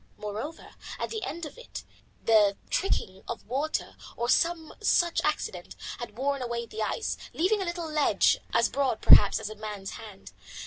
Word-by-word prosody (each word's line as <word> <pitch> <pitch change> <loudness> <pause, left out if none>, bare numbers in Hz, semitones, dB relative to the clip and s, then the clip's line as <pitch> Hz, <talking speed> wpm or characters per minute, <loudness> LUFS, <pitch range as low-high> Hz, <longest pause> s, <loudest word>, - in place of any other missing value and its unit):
Moreover, 215 +10 -6 0.3
at - - -3
the 440 -1 -3
end 335 +3 -4
of 305 - -10
it - - -8 0.4
the 210 -3 +5
trickling 195 - 0
of 235 - -5
water, 280 +6 -2 0.2
or 240 +1 -1
some 330 +3 +2
such 345 -1 +3
accident, 195 -12 -2 0.2
had 235 -3 -7
worn 275 +1 0
away 235 -1 -2
the 220 -1 -6
ice, 320 - -1 0.2
leaving 390 +5 +2
a - - -1
little 345 -1 -3
ledge 305 -2 +3
as - - +4
broad, 270 -5 0
perhaps, 205 - +8
as 215 -1 -5
a - - -7
man's 210 -2 -6
hand. 210 -3 -10
250 Hz, 170 wpm, -28 LUFS, 215-325 Hz, 0.4 s, perhaps